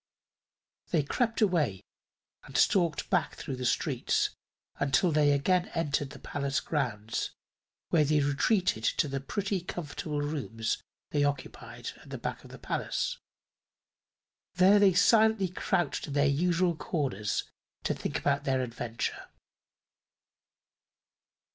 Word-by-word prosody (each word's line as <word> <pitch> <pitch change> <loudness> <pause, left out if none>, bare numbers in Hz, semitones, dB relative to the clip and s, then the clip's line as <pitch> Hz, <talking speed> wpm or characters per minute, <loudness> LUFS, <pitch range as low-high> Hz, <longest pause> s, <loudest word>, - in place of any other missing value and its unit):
They 160 -4 +2
crept 230 - 0
away 160 - +2 0.6
and - - -5
stalked 170 -5 +2
back 180 -4 +1
through 135 - -5
the 125 -1 -1
streets - - +1 0.5
until 140 +6 +3
they 150 -1 +4
again 175 +6 +2
entered 150 -3 0
the 145 - -10
palace 140 0 -2
grounds, 110 -8 -2 0.5
where 160 -3 +4
they 150 +1 +3
retreated 145 - +1
to 150 - +2
the 135 -1 -2
pretty, 195 +6 -2
comfortable 150 -3 -4
rooms 130 -7 -2 0.3
they 145 -1 +2
occupied 145 -1 -3
at - - -15
the - - -5
back - - -5
of - - -13
the - - -10
palace. - - -2 1.4
There 190 +3 +6
they 200 -2 +6
silently 220 0 +4
crouched 175 -4 -1
in 145 - -5
their 145 0 +3
usual 170 +4 +2
corners 130 - -1 0.4
to - - +1
think - - -4
over - - +3
their 130 -1 +1
adventure. 115 -1 -4
150 Hz, 125 wpm, -30 LUFS, 140-180 Hz, 1.4 s, There